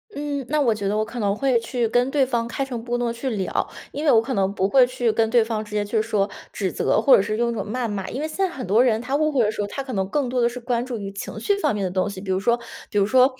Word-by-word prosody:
嗯， 285 Hz, -2 st, -3 dB
那 305 Hz, 0 st, +1 dB
我 240 Hz, -6 st, +3 dB
觉 200 Hz, -2 st, -3 dB
得 210 Hz, -, 0 dB
我 215 Hz, -, +1 dB
可 235 Hz, +2 st, -7 dB
能 200 Hz, -2 st, +1 dB
会 255 Hz, 0 st, +2 dB
去 235 Hz, 0 st, -1 dB
跟 245 Hz, +3 st, +2 dB
对 275 Hz, -1 st, +2 dB
方 235 Hz, -2 st, -1 dB
开 270 Hz, +3 st, -2 dB
诚 240 Hz, -4 st, -5 dB
布 240 Hz, 0 st, -1 dB
公 -, -, -4 dB
地 230 Hz, -, -1 dB
去 235 Hz, +3 st, -3 dB
聊， 200 Hz, -6 st, -1 dB, 0.2 s
因 295 Hz, -, -4 dB
为 295 Hz, -, +4 dB
我 225 Hz, -, +6 dB
可 230 Hz, +4 st, -2 dB
能 195 Hz, -2 st, +1 dB
不 190 Hz, -, +1 dB
会 255 Hz, +4 st, +6 dB
去 245 Hz, -2 st, 0 dB
跟 225 Hz, 0 st, +1 dB
对 235 Hz, -1 st, +4 dB
方 220 Hz, -1 st, -3 dB
直 210 Hz, -, -14 dB
接 205 Hz, -1 st, 0 dB
去 215 Hz, +1 st, +1 dB
说 215 Hz, -3 st, 0 dB, 0.2 s
指 190 Hz, -3 st, -2 dB
责， -, -, +1 dB
或 275 Hz, -, +7 dB
者 -, -, +4 dB
是 215 Hz, +2 st, -2 dB
用 235 Hz, 0 st, +1 dB
一 -, -, -3 dB
种 -, -, -3 dB
谩 245 Hz, +1 st, -1 dB
骂。 200 Hz, -3 st, -4 dB
因 255 Hz, -, -5 dB
为 310 Hz, -, -2 dB
现 315 Hz, -, -8 dB
在 385 Hz, -1 st, +2 dB
很 265 Hz, -, -6 dB
多 215 Hz, +6 st, +4 dB
人 225 Hz, -3 st, +2 dB
他 260 Hz, +3 st, -2 dB
误 305 Hz, +1 st, +2 dB
会 255 Hz, -5 st, +3 dB
的 210 Hz, -, +1 dB
时 215 Hz, -, -4 dB
候， 205 Hz, -, -2 dB
他 275 Hz, +6 st, -5 dB
可 260 Hz, -2 st, -6 dB
能 190 Hz, -1 st, 0 dB
更 285 Hz, +1 st, 0 dB
多 250 Hz, 0 st, 0 dB
的 235 Hz, -, +3 dB
是 250 Hz, +1 st, -7 dB
关 240 Hz, -1 st, -1 dB
注 250 Hz, -2 st, -4 dB
于 200 Hz, -2 st, -5 dB
情 200 Hz, +2 st, -7 dB
绪 405 Hz, -, +1 dB
方 300 Hz, -, +1 dB
面 205 Hz, -, -2 dB
的 185 Hz, -, -2 dB
东 185 Hz, +2 st, 0 dB
西， 200 Hz, -, -7 dB
比 190 Hz, -2 st, -4 dB
如 185 Hz, -, +1 dB
说 235 Hz, +4 st, +2 dB, 0.3 s
比 205 Hz, -, -3 dB
如 200 Hz, -, +4 dB
说 255 Hz, +4 st, +5 dB
235 Hz, 365 characters per minute, -23 LUFS, 210-255 Hz, 0.3 s, 或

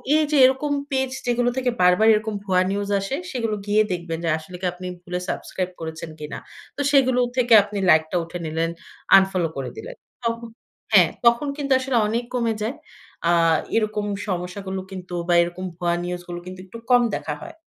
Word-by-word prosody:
এইযে 305 Hz, -1 st, +2 dB
এরকম 265 Hz, +3 st, +1 dB, 0.2 s
পেজ 265 Hz, -1 st, +1 dB, 0.2 s
যেগুলো 245 Hz, 0 st, +2 dB
থেকে 255 Hz, -1 st, +1 dB
বারবার 180 Hz, +5 st, +5 dB
এরকম 215 Hz, 0 st, -1 dB
ভুয়া 185 Hz, -2 st, +3 dB
নিউজ 200 Hz, 0 st, -2 dB
আসে, 195 Hz, +7 st, -3 dB, 0.2 s
সেগুলো 230 Hz, -5 st, -1 dB
গিয়ে 210 Hz, +1 st, +4 dB
দেখবেন 170 Hz, -2 st, -3 dB
যে 165 Hz, -, +1 dB
আসলে 160 Hz, +3 st, -10 dB
কি -, -, -3 dB
আপনি 180 Hz, +1 st, -8 dB, 0.2 s
ভুলে 180 Hz, 0 st, -3 dB
subscribe 185 Hz, -1 st, -3 dB
করেছেন 160 Hz, 0 st, -6 dB
কিনা। 150 Hz, 0 st, -6 dB, 0.4 s
তো 285 Hz, -, -1 dB
সেগুলো 260 Hz, -3 st, +4 dB, 0.2 s
থেকে 240 Hz, -2 st, +3 dB
আপনি 205 Hz, 0 st, -7 dB
লাইকটা 160 Hz, +2 st, +3 dB
উঠে 170 Hz, +2 st, -7 dB
নিলেন, 160 Hz, +1 st, -1 dB, 0.5 s
unfollow 185 Hz, -4 st, +1 dB
করে 135 Hz, -2 st, -3 dB
দিলেন। -, -, -8 dB, 0.3 s
তখন 230 Hz, 0 st, -2 dB, 0.5 s
হ্যাঁ, -, -, +7 dB, 0.2 s
তখন 235 Hz, +5 st, +4 dB
কিন্তু 280 Hz, -2 st, -3 dB
আসলে 260 Hz, -2 st, 0 dB
অনেক 230 Hz, +3 st, -1 dB
কমে 230 Hz, -2 st, +1 dB
যায়। 225 Hz, +7 st, -2 dB, 0.5 s
আ -, -, +5 dB, 0.5 s
এরকম 215 Hz, -1 st, 0 dB, 0.2 s
সমস্যাগুলো 190 Hz, +1 st, -4 dB
কিন্তু 180 Hz, -1 st, -8 dB
বা, 175 Hz, -, +3 dB
এরকম 175 Hz, +2 st, -5 dB
ভুয়া 175 Hz, -1 st, 0 dB
নিউজগুলো 175 Hz, 0 st, -5 dB
কিন্তু 185 Hz, 0 st, -9 dB
একটু 190 Hz, +5 st, -10 dB
কম 245 Hz, -, +7 dB
দেখা -, -, -4 dB
হয়। 335 Hz, -1 st, -9 dB
200 Hz, 175 wpm, -23 LUFS, 180-245 Hz, 0.5 s, হ্যাঁ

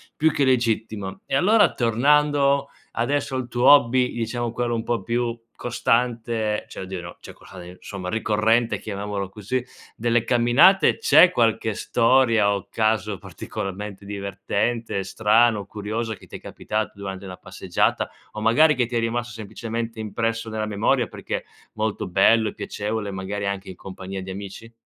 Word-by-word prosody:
più 160 Hz, -, +3 dB
che 140 Hz, -, +1 dB
legittimo. 110 Hz, -6 st, 0 dB
E -, -, -2 dB
allora 205 Hz, +7 st, +4 dB
tornando 140 Hz, +3 st, +2 dB, 0.3 s
adesso 135 Hz, +3 st, -1 dB
al 130 Hz, -2 st, -3 dB
tuo 120 Hz, +1 st, +3 dB
hobby, 130 Hz, -2 st, +4 dB
diciamo 120 Hz, 0 st, -3 dB
quello 120 Hz, 0 st, -1 dB
un 115 Hz, -, -2 dB
po' 120 Hz, -1 st, -2 dB
più 120 Hz, 0 st, -1 dB, 0.2 s
costante 115 Hz, -3 st, 0 dB
cioè -, -, -10 dB
oddio, 95 Hz, -1 st, -6 dB
no 85 Hz, 0 st, -10 dB
cioè -, -, -11 dB
quello 90 Hz, -1 st, -13 dB
insomma 90 Hz, +1 st, -8 dB
ricorrente, 110 Hz, +2 st, +1 dB
chiamiamolo 100 Hz, -2 st, -4 dB
così, 110 Hz, +6 st, -3 dB, 0.3 s
delle 120 Hz, 0 st, +1 dB
camminate, 120 Hz, +11 st, +4 dB
c'è 170 Hz, -4 st, +6 dB
qualche 115 Hz, -, +1 dB
storia 115 Hz, -4 st, +3 dB
o 100 Hz, -1 st, -6 dB
caso 110 Hz, -3 st, 0 dB
particolarmente 100 Hz, -1 st, -6 dB
divertente, 100 Hz, +2 st, -2 dB
strano, 110 Hz, +1 st, +2 dB
curioso 110 Hz, +2 st, -4 dB
che -, -, -16 dB
ti -, -, -9 dB
è -, -, -16 dB
capitato 110 Hz, -3 st, -4 dB
durante 100 Hz, -1 st, -7 dB
una 90 Hz, -1 st, -8 dB
passeggiata -, -, -1 dB, 0.2 s
o 110 Hz, -, -7 dB
magari 150 Hz, +8 st, +5 dB
che 125 Hz, -3 st, 0 dB
ti 120 Hz, -, -5 dB
è 115 Hz, -, +3 dB
rimasto 115 Hz, 0 st, -2 dB
semplicemente 115 Hz, +1 st, -5 dB
impresso 115 Hz, +1 st, -2 dB
nella 110 Hz, 0 st, -2 dB
memoria, 105 Hz, -1 st, +1 dB
perché -, -, -5 dB, 0.3 s
molto 110 Hz, -2 st, -2 dB
bello 105 Hz, +4 st, +4 dB
e -, -, -11 dB
piacevole 105 Hz, -1 st, -4 dB
magari 95 Hz, +2 st, -4 dB
anche 100 Hz, -1 st, -3 dB
in 95 Hz, -, -8 dB
compagnia 95 Hz, 0 st, -7 dB
di 95 Hz, -, -7 dB
amici? 100 Hz, +4 st, -8 dB
110 Hz, 155 wpm, -23 LUFS, 100-120 Hz, 0.3 s, c'è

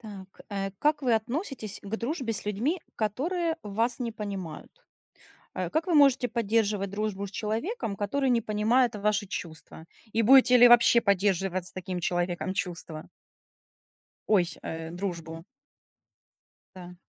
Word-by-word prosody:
Так, 200 Hz, -4 st, -10 dB, 0.2 s
э. 195 Hz, -1 st, -3 dB
Как 300 Hz, 0 st, +1 dB
вы 245 Hz, -3 st, +3 dB
относитесь 240 Hz, -, -4 dB
к 205 Hz, +2 st, -4 dB
дружбе 250 Hz, 0 st, -3 dB
с 215 Hz, -, -5 dB
людьми, 240 Hz, -, -1 dB, 0.2 s
которые 320 Hz, -, -1 dB
вас 225 Hz, +4 st, -1 dB
не 235 Hz, -2 st, -2 dB
понимают? 195 Hz, -7 st, -6 dB, 0.9 s
Э, -, -, -2 dB
как 320 Hz, +2 st, -1 dB
вы 350 Hz, -, +1 dB
можете 275 Hz, -3 st, +5 dB
поддерживать 215 Hz, -3 st, 0 dB
дружбу 200 Hz, -1 st, -3 dB
с -, -, -13 dB
человеком, 220 Hz, -, -3 dB
который 260 Hz, +7 st, -1 dB
не 240 Hz, -2 st, +3 dB
понимает 220 Hz, +3 st, +1 dB
ваши 210 Hz, 0 st, 0 dB
чувства? 160 Hz, -3 st, -8 dB, 0.3 s
И 225 Hz, -, +2 dB
будете 250 Hz, +2 st, +7 dB
ли 245 Hz, 0 st, +9 dB
вообще 240 Hz, 0 st, +6 dB
поддерживать 190 Hz, -3 st, +1 dB
с -, -, -7 dB
таким 185 Hz, -1 st, -5 dB
человеком 175 Hz, +1 st, -1 dB
чувства? 170 Hz, -4 st, -5 dB, 1.2 s
Ой 205 Hz, -4 st, +5 dB
сь -, -, -8 dB
э, 160 Hz, 0 st, -5 dB
дружбу. 170 Hz, -3 st, -5 dB, 1.3 s
Да. 180 Hz, -1 st, -10 dB
210 Hz, 140 wpm, -27 LUFS, 190-245 Hz, 1.3 s, ли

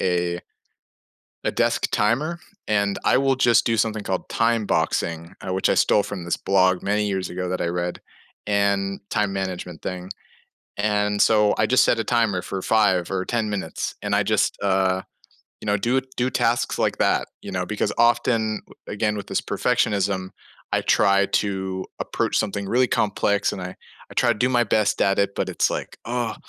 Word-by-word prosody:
a 90 Hz, -1 st, 0 dB, 1.1 s
a -, -, +1 dB
desk -, -, +1 dB
timer, 145 Hz, +11 st, +1 dB, 0.3 s
and 100 Hz, -1 st, +1 dB
I -, -, +4 dB
will 135 Hz, -1 st, +2 dB
just 120 Hz, -3 st, +4 dB
do 115 Hz, -, +1 dB
something 110 Hz, -1 st, 0 dB
called 95 Hz, -1 st, -3 dB
time 115 Hz, -2 st, +1 dB
boxing, 85 Hz, -3 st, -1 dB
which 95 Hz, +1 st, +1 dB
I -, -, +3 dB
stole 105 Hz, -, +4 dB
from 100 Hz, -3 st, -6 dB
this 85 Hz, -, -1 dB
blog 95 Hz, -1 st, +2 dB
many 105 Hz, +1 st, 0 dB
years 95 Hz, -2 st, -2 dB
ago 90 Hz, 0 st, -4 dB
that 90 Hz, -, -2 dB
I 85 Hz, -, 0 dB
read, 90 Hz, +1 st, -3 dB, 0.5 s
and 100 Hz, -1 st, +1 dB
time 105 Hz, -3 st, +1 dB
management 90 Hz, -3 st, -5 dB
thing, 90 Hz, 0 st, -5 dB, 0.7 s
and 105 Hz, 0 st, +1 dB
so 105 Hz, -2 st, +4 dB
I 105 Hz, -, +2 dB
just 130 Hz, -, +4 dB
set 120 Hz, -, +3 dB
a 115 Hz, -, 0 dB
timer 110 Hz, -6 st, +1 dB
for 95 Hz, -1 st, -5 dB
5 95 Hz, -6 st, +2 dB
or 95 Hz, -1 st, -1 dB
10 115 Hz, -1 st, -1 dB
minutes, 95 Hz, -6 st, -4 dB
and -, -, -2 dB
I -, -, +4 dB
just, -, -, +1 dB
uh, 95 Hz, -1 st, +1 dB, 0.6 s
you -, -, -9 dB
know, 105 Hz, 0 st, +2 dB
do 120 Hz, +6 st, +1 dB, 0.2 s
do 125 Hz, +1 st, 0 dB
tasks 115 Hz, -1 st, 0 dB
like -, -, 0 dB
that. -, -, +2 dB
You -, -, -8 dB
know? 90 Hz, -1 st, -2 dB
Because 105 Hz, +1 st, -1 dB
often, 115 Hz, -2 st, +2 dB, 0.3 s
again, 105 Hz, 0 st, -1 dB
with 100 Hz, -, -5 dB
this -, -, -1 dB
perfectionism, 95 Hz, -2 st, 0 dB, 0.4 s
I -, -, +1 dB
try 100 Hz, +1 st, +3 dB
to 95 Hz, -2 st, -2 dB
approach -, -, -1 dB
something 100 Hz, -2 st, -2 dB
really 125 Hz, +3 st, +3 dB
complex, 100 Hz, -1 st, +1 dB
and 95 Hz, -, -6 dB
I 90 Hz, +1 st, -7 dB, 0.4 s
I -, -, -9 dB
try 120 Hz, -2 st, +3 dB
to 110 Hz, -, -2 dB
do 125 Hz, -, +2 dB
my 120 Hz, -2 st, +3 dB
best 110 Hz, -2 st, +1 dB
at 100 Hz, 0 st, +3 dB
it, 100 Hz, 0 st, +2 dB
but 95 Hz, -, -1 dB
it's 90 Hz, -, +1 dB
like, -, -, -5 dB
"Ugh." 120 Hz, -1 st, -2 dB
100 Hz, 185 wpm, -23 LUFS, 95-110 Hz, 1.1 s, I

